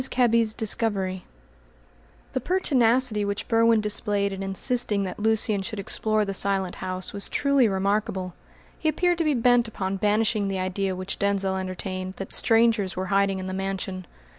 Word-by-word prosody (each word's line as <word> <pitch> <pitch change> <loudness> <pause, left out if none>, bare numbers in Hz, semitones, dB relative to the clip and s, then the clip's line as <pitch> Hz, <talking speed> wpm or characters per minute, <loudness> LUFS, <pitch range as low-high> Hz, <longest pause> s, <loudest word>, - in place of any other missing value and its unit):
KEBBY'S 230 -3 +2
DISCOVERY 200 -5 -1 1.1
The - - 0
pertinacity 250 - +2
which 200 0 -3
Berwin 230 -1 +4
displayed 205 -1 0
in 195 - -6
insisting 200 +2 -1
that 185 +1 -5
Lucian 215 -1 +1
should 215 +3 -6
explore 215 +2 0
the 195 - -3
Silent 195 -1 -1
House 185 0 -4
was 200 0 -5
truly 280 -4 +3
remarkable. 195 -2 -1 0.5
He 315 - +1
appeared 350 +3 +1
to - - +2
be 305 -3 +1
bent 245 0 +3
upon 195 -3 -3
banishing 210 +1 +1
the 195 -1 -2
idea 185 +1 -2
which 185 +1 -3
Denzil 195 -1 0
entertained 185 0 -4
that 195 - -6
strangers 225 -4 +2
were 185 - -2
hiding 195 -1 +2
in 185 - -5
the 185 - -4
mansion. 190 -1 -4
200 Hz, 160 wpm, -25 LUFS, 190-230 Hz, 1.1 s, Berwin